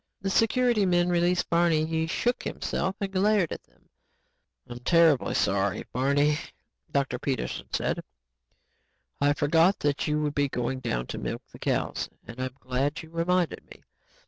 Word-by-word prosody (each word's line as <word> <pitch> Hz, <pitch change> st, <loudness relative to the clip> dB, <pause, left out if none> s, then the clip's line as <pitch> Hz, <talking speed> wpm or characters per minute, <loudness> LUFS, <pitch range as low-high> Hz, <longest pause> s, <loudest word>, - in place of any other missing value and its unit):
The 195 Hz, 0 st, -2 dB
security 235 Hz, 0 st, +3 dB
men 175 Hz, -1 st, +2 dB
released 175 Hz, +1 st, +2 dB
Barney. 170 Hz, -2 st, +3 dB
He 160 Hz, 0 st, -1 dB
shook 240 Hz, +9 st, 0 dB
himself 185 Hz, +2 st, -2 dB
and 200 Hz, -2 st, -3 dB
glared 195 Hz, -2 st, +2 dB
at -, -, -5 dB
them. -, -, -32 dB, 0.8 s
"I'm 120 Hz, -, -8 dB
terribly, 160 Hz, 0 st, +3 dB
sorry, 100 Hz, -1 st, +1 dB
Barney," 145 Hz, +3 st, +2 dB, 0.5 s
Dr. 135 Hz, -3 st, 0 dB
Peterson 135 Hz, 0 st, -3 dB
said. -, -, -1 dB, 1.2 s
"I 145 Hz, 0 st, +4 dB
forgot 160 Hz, +6 st, +3 dB
that 145 Hz, -1 st, 0 dB
you 150 Hz, 0 st, +1 dB
would 145 Hz, -1 st, -1 dB
be 145 Hz, -1 st, +1 dB
going 130 Hz, +1 st, -2 dB
down 90 Hz, -, -2 dB
to -, -, -6 dB
milk -, -, -4 dB
the -, -, -13 dB
cows -, -, -1 dB, 0.2 s
and 120 Hz, +2 st, -8 dB
I'm 130 Hz, 0 st, -4 dB
glad 135 Hz, +5 st, -2 dB
you 160 Hz, -, -14 dB
reminded 170 Hz, +1 st, 0 dB
me. -, -, -14 dB
160 Hz, 155 wpm, -27 LUFS, 135-180 Hz, 1.2 s, I